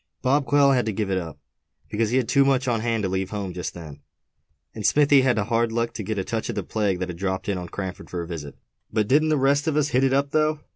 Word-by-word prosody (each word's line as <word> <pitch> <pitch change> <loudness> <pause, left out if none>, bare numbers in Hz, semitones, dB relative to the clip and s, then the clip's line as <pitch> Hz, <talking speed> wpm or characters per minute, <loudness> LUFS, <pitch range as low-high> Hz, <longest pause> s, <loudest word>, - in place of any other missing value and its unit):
Bob 140 +2 +2
Quail 140 -1 +5
had 125 -3 +1
to - - +1
give 105 -1 -2
it 95 - +1
up, 80 -5 -8 0.5
because 110 0 0
he 125 - +1
had 125 -3 +1
too 140 -1 +4
much 135 -1 +1
on 120 -2 +1
hand 115 -1 -1
to 95 - 0
leave 95 0 -2
home 100 -3 -4
just 90 - -5
then; 75 -4 -10 0.7
and 110 - -7
Smithy 145 +3 +5
had 130 -3 +2
the 105 - +1
hard 115 +1 0
luck 115 +1 -1
to - - -5
get 105 +1 -3
a 95 - -1
touch 115 +4 -3
of 120 - -3
the 100 - -2
plague 100 -1 -1
that 90 0 -4
had 85 -1 -7
dropped 95 -1 -2
in 100 -3 -1
on 90 -1 -7
Cranford 95 -2 -6
for 90 - -4
a - - -8
visit; 75 -5 -7 0.4
but 110 -2 0
didn't 155 +5 +3
the 155 - +2
rest 140 +2 +2
of 155 -2 +1
us 150 -1 +2
hit 130 -1 +2
it 135 - +3
up, 140 +1 +1
though?" 155 0 +1
115 Hz, 285 wpm, -24 LUFS, 95-135 Hz, 0.7 s, Quail